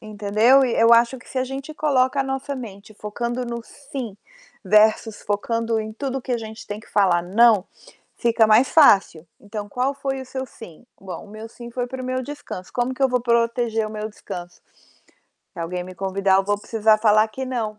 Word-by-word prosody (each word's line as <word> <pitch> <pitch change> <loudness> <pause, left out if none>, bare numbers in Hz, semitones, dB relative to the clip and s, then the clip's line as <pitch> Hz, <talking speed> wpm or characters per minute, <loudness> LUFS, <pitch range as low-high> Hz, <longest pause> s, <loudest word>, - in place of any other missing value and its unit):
entendeu? 215 +5 +3
E 240 - -1
eu 230 +1 +5
acho 235 +3 +4
que 250 - -18
se 265 - -3
a 255 - +1
gente 275 +4 -7
coloca 275 -2 +1
a - - +3
nossa 270 +1 -4
mente 215 -4 -10
focando 235 +4 -4
no 235 -1 -5
"sim" 255 -6 -8 0.5
versus 215 +2 +3
focando 225 +2 -1
em 215 0 -6
tudo 270 +3 -4
que 260 - -3
a 240 - 0
gente 220 0 -9
tem 210 +1 -6
que - - -19
falar 185 -4 +3
"não", 210 +2 +4 0.5
fica 230 -2 +3
mais 220 +5 +5
fácil. 195 - +4
Então, 205 0 -7
qual 255 +5 -1
foi 270 -1 -4
o - - -9
seu 260 +1 -5
"sim"? 225 -3 -14
"Bom, 190 -2 -8
o 205 - -16
meu 215 +1 -9
'sim' 240 0 -11
foi 245 +1 -3
para 260 +1 -6
o - - -6
meu 255 0 -2
descanso. 255 -9 -8
Como 245 +1 -1
que 265 - -10
eu 265 - +4
vou 250 -1 +1
proteger 235 -2 +1
o - - -9
meu 215 0 -5
descanso? 175 -4 -9 0.9
Se - - -14
alguém 180 +2 -3
me 185 0 -10
convidar, 195 0 +1
eu 195 - +2
vou 205 0 0
precisar 220 0 +2
falar 215 0 +4
que 260 +5 -6
"não"". 225 -5 -3
230 Hz, 210 wpm, -22 LUFS, 210-255 Hz, 0.9 s, eu